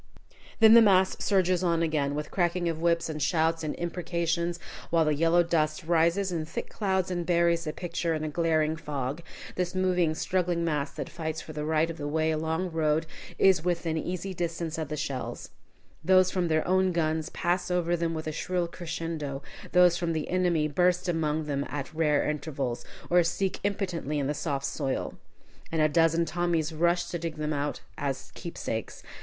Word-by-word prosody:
Then 220 Hz, -1 st, +8 dB
the 235 Hz, -, +10 dB
mass 190 Hz, -3 st, +4 dB
surges 185 Hz, -2 st, +2 dB
on 170 Hz, -2 st, +2 dB
again, 145 Hz, -3 st, 0 dB
with 150 Hz, 0 st, -4 dB
cracking 175 Hz, -1 st, 0 dB
of 165 Hz, -1 st, -2 dB
whips 170 Hz, 0 st, +2 dB
and 155 Hz, -1 st, -5 dB
shouts 165 Hz, +2 st, +1 dB
and 155 Hz, -, -2 dB
imprecations, 170 Hz, 0 st, -1 dB, 0.3 s
while 165 Hz, -1 st, +3 dB
the 155 Hz, -, +2 dB
yellow 165 Hz, +3 st, +4 dB
dust 155 Hz, -2 st, 0 dB
rises 170 Hz, +4 st, +2 dB
in 165 Hz, -3 st, -1 dB
thick 155 Hz, -, -6 dB
clouds 190 Hz, -3 st, 0 dB
and 175 Hz, -1 st, -1 dB
buries 170 Hz, -1 st, +2 dB
the 155 Hz, -, -2 dB
picture 170 Hz, 0 st, -2 dB
in 155 Hz, -, -3 dB
a -, -, -1 dB
glaring 160 Hz, 0 st, +1 dB
fog. 145 Hz, -1 st, -4 dB, 0.3 s
This 180 Hz, 0 st, -2 dB
moving, 180 Hz, -4 st, +2 dB
struggling 175 Hz, 0 st, 0 dB
mass, 150 Hz, -3 st, 0 dB
that 150 Hz, -, -5 dB
fights 160 Hz, -2 st, -4 dB
for 155 Hz, -, -9 dB
the 150 Hz, 0 st, -3 dB
right 160 Hz, +1 st, +2 dB
of 165 Hz, -, -10 dB
way 155 Hz, +2 st, 0 dB
along 160 Hz, +2 st, -1 dB
the 185 Hz, -, -3 dB
road, 160 Hz, 0 st, +1 dB, 0.3 s
is 190 Hz, -4 st, +4 dB
within 170 Hz, -2 st, -1 dB
easy 180 Hz, +4 st, -3 dB
distance 165 Hz, -2 st, -3 dB
of 160 Hz, -, -2 dB
the 150 Hz, +1 st, -4 dB
shells. 140 Hz, -3 st, -4 dB, 0.5 s
Those 185 Hz, +1 st, +5 dB
from 180 Hz, -2 st, 0 dB
their 155 Hz, -1 st, +1 dB
own 185 Hz, 0 st, +3 dB
guns 160 Hz, -2 st, 0 dB
pass 180 Hz, +1 st, -1 dB
over 175 Hz, -1 st, +1 dB
them 165 Hz, -1 st, -1 dB
with 160 Hz, -, -4 dB
a 155 Hz, -, -2 dB
shrill 175 Hz, +2 st, -1 dB
crescendo, 160 Hz, -5 st, -5 dB, 0.3 s
those 180 Hz, -1 st, +5 dB
from 170 Hz, -1 st, -1 dB
the 155 Hz, -1 st, -3 dB
enemy 175 Hz, -4 st, +2 dB
burst 180 Hz, +4 st, +2 dB
among 160 Hz, -2 st, 0 dB
them 140 Hz, -2 st, -2 dB
at 145 Hz, +1 st, -5 dB
rare 150 Hz, -2 st, +2 dB
intervals, 140 Hz, -5 st, -3 dB, 0.3 s
or 175 Hz, 0 st, +6 dB
sink 180 Hz, +3 st, -1 dB
impotently 180 Hz, -7 st, -2 dB
in 140 Hz, -, 0 dB
the 145 Hz, -, 0 dB
soft 140 Hz, -3 st, -2 dB
soil. 135 Hz, -1 st, -3 dB, 0.5 s
And 165 Hz, -, -1 dB
a 155 Hz, -, +5 dB
dozen 165 Hz, +2 st, +3 dB
Tommies 165 Hz, -1 st, 0 dB
rush 170 Hz, +2 st, +2 dB
to 175 Hz, -, -2 dB
dig 165 Hz, -1 st, -4 dB
them 155 Hz, 0 st, -2 dB
out 145 Hz, 0 st, -2 dB, 0.2 s
as 135 Hz, -2 st, -3 dB
keepsakes. 115 Hz, -9 st, -5 dB
165 Hz, 185 wpm, -28 LUFS, 155-175 Hz, 0.5 s, the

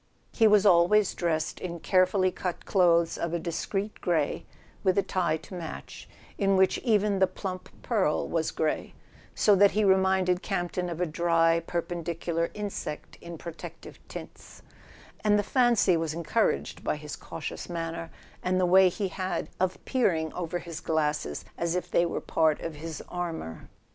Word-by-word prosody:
He 225 Hz, -, +5 dB
was 210 Hz, -1 st, +5 dB
always 190 Hz, +2 st, +5 dB
dressed 160 Hz, -3 st, -1 dB
in 170 Hz, -2 st, -5 dB
carefully 185 Hz, +1 st, +3 dB
cut 180 Hz, -1 st, -4 dB
clothes 170 Hz, -3 st, +3 dB
of 170 Hz, 0 st, -1 dB
a -, -, -1 dB
discreet 195 Hz, +5 st, -3 dB
grey, 160 Hz, -5 st, 0 dB, 0.4 s
with 185 Hz, -1 st, +2 dB
a 200 Hz, -, +4 dB
tie 175 Hz, -4 st, 0 dB
to 160 Hz, -, -13 dB
match, 170 Hz, -3 st, -8 dB, 0.3 s
in 195 Hz, -1 st, +3 dB
which 190 Hz, 0 st, +3 dB
even 210 Hz, -4 st, +2 dB
the 190 Hz, -, +5 dB
plump 185 Hz, -1 st, -6 dB
pearl 205 Hz, -10 st, +1 dB
was 160 Hz, -1 st, 0 dB
grey, 155 Hz, -1 st, -2 dB, 0.4 s
so 210 Hz, -, +5 dB
that 200 Hz, +1 st, +6 dB
he 215 Hz, -, +4 dB
reminded 190 Hz, -2 st, +3 dB
Campton 180 Hz, -2 st, -2 dB
of 170 Hz, 0 st, -4 dB
a -, -, +3 dB
dry 165 Hz, 0 st, +2 dB
perpendicular 170 Hz, 0 st, -2 dB
insect 205 Hz, -7 st, -5 dB
in 170 Hz, -1 st, -8 dB
protective 170 Hz, 0 st, -9 dB
tints; -, -, -10 dB, 0.6 s
and 210 Hz, -1 st, +4 dB
the 205 Hz, -, +1 dB
fancy 235 Hz, -6 st, +3 dB
was 160 Hz, -1 st, -1 dB
encouraged 170 Hz, +7 st, 0 dB
by -, -, 0 dB
his 150 Hz, 0 st, -7 dB
cautious 165 Hz, +1 st, -7 dB
manner, 165 Hz, -1 st, -4 dB, 0.3 s
and 185 Hz, 0 st, +1 dB
the 185 Hz, -, +3 dB
way 185 Hz, +1 st, +6 dB
he 195 Hz, +2 st, -3 dB
had 185 Hz, 0 st, -3 dB
of 185 Hz, 0 st, 0 dB
peering 165 Hz, -11 st, +1 dB
over 175 Hz, -1 st, -3 dB
his 170 Hz, -2 st, -7 dB
glasses 150 Hz, -, -1 dB
as 170 Hz, 0 st, 0 dB
if 180 Hz, -, -3 dB
they 170 Hz, -, +3 dB
were -, -, -2 dB
part 155 Hz, -2 st, +2 dB
of 165 Hz, -, -4 dB
his 160 Hz, +1 st, -7 dB
armour. 165 Hz, -, -5 dB
175 Hz, 165 wpm, -28 LUFS, 165-190 Hz, 0.6 s, that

